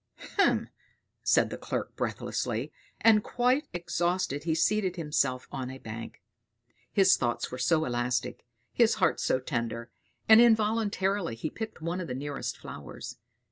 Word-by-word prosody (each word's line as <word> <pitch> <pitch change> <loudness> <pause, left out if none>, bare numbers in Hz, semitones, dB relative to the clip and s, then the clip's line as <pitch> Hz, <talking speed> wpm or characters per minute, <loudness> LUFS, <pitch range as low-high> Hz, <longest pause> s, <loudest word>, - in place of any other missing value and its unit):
hem!" 395 - +3 0.5
said - - +3
the - - -5
clerk - - -4
breathlessly, - - -2 0.3
and 215 -2 +6
quite 255 +4 +1
exhausted 175 -3 -1
he 160 -2 +1
seated 190 +1 +1
himself 140 -6 0
on 130 -2 -4
a 130 - -7
bank. 115 -2 -8 0.7
His 190 -2 +5
thoughts 120 -1 -1
were 125 - -6
so 155 +6 +2
elastic, 125 0 -1 0.3
his 235 -2 +4
heart 195 - +2
so 130 - +1
tender; 115 -1 -3 0.4
and 220 +1 +9
involuntarily 210 - +2
he 135 +7 -4
picked 220 -7 -7
one 175 +3 -2
of 170 - -5
the 125 - -4
nearest 140 +1 -4
flowers. 70 -3 -9
165 Hz, 140 wpm, -29 LUFS, 125-210 Hz, 0.7 s, and